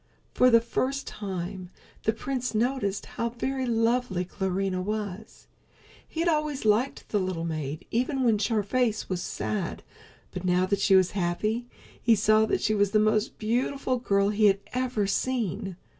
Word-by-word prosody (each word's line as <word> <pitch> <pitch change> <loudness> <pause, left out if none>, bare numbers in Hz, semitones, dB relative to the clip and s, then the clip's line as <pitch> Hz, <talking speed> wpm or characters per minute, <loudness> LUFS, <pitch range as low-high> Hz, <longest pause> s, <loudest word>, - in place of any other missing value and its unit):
For 250 - +5
the 230 -1 +6
first 270 +4 -1
time 185 -2 -5 0.4
the 220 - +4
prince 250 +1 -3
noticed 220 -3 0
how 235 - -3
very 260 +2 -2
lovely 230 -4 +1
Clarinha 190 0 -2
was. 210 +1 -5 0.6
He 325 - -4
had 340 - +1
always 300 -5 0
liked 220 +6 +1
the 210 - +1
little 185 -3 -2
maid 155 -1 -4
even 260 +3 0
when 225 -4 +3
her 220 -3 +1
face 225 0 0
was 180 -2 -2
sad, 195 -2 -3 0.5
but 180 - -6
now 180 0 +2
that 200 +1 0
she 195 0 +4
was 185 -1 +4
happy 210 +6 -1 0.3
he 230 -2 +5
saw 215 +1 +4
that - - 0
she 215 - +2
was 205 -1 +2
the 215 - +5
most 215 +1 +1
beautiful 250 +3 0
girl 200 -4 +2
he 210 0 +4
had 195 0 +3
ever 250 -4 0
seen. 200 -3 -1
215 Hz, 165 wpm, -27 LUFS, 195-245 Hz, 0.6 s, the